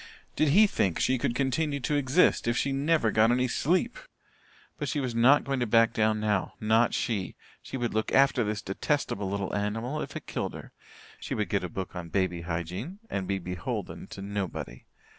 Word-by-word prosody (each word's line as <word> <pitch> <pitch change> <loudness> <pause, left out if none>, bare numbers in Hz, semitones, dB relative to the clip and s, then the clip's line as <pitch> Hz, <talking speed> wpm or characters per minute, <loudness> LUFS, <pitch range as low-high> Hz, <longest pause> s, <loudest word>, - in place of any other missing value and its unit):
Did 155 - +2
he 195 +10 +6
think 95 - 0
she 130 -1 +2
could 120 - -1
continue 140 +3 0
to 135 - -1
exist 145 0 +3
if 120 0 +1
she 140 - 0
never 140 -3 +2
got 110 +2 +4
any 125 +1 +2
sleep? 180 - 0 0.8
But - - -2
she 150 - -1
was 130 -3 -2
not 125 +5 +5
going 135 -1 -2
to 120 - 0
back 115 +1 +4
down 110 0 +2
now 105 -3 0
not 110 +2 +3
she. 105 -6 -2 0.3
She - - -6
would 120 -2 -2
look 110 0 -1
after 135 -2 +4
this 105 -1 -3
detestable 100 -1 -1
little 100 0 -2
animal 115 +8 -2
if - - -6
it - - -6
killed - - -3
her. - - -10 0.5
She - - -4
would - - -1
get - - 0
a - - -3
book 95 0 -6
on 85 -2 -6
baby 90 0 0
hygiene 90 - -4
and 95 -2 -2
be 100 0 0
beholden 90 -2 -5
to 95 - -8
nobody. 100 -3 -5
115 Hz, 200 wpm, -28 LUFS, 100-135 Hz, 0.8 s, he